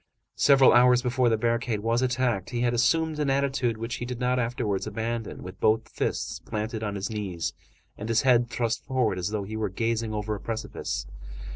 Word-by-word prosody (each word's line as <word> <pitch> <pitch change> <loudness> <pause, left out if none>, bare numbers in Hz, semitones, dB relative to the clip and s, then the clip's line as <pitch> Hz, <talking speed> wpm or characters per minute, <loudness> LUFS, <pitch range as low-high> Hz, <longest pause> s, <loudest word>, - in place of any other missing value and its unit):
Several 135 -2 +6
hours 125 +1 +5
before 125 -1 +2
the 110 - +2
barricade 115 -1 0
was 115 +2 +1
attacked, 125 -6 0
he 120 -1 -2
had 120 0 +2
assumed 155 +6 +2
an 145 -2 +1
attitude 135 -4 +1
which 115 +2 -4
he - - -5
did 125 -1 -5
not 125 0 +1
afterwards 115 -5 -1
abandon, 115 0 -4
with 90 +1 -9
both 110 +1 +2
fists - - -3
planted 110 +1 -4
on 105 -2 -3
his 100 +2 -3
knees 90 -6 -3 0.5
and 105 +2 -5
his 115 0 +2
head 120 -2 +4
thrust 115 -2 -1
forward 125 -8 0
as 90 +2 -1
though 105 -1 -2
he 105 +3 -6
were 110 -2 -1
gazing 115 +3 -1
over 105 0 -2
a 105 - -4
precipice. 115 - -4
115 Hz, 195 wpm, -27 LUFS, 110-125 Hz, 0.5 s, Several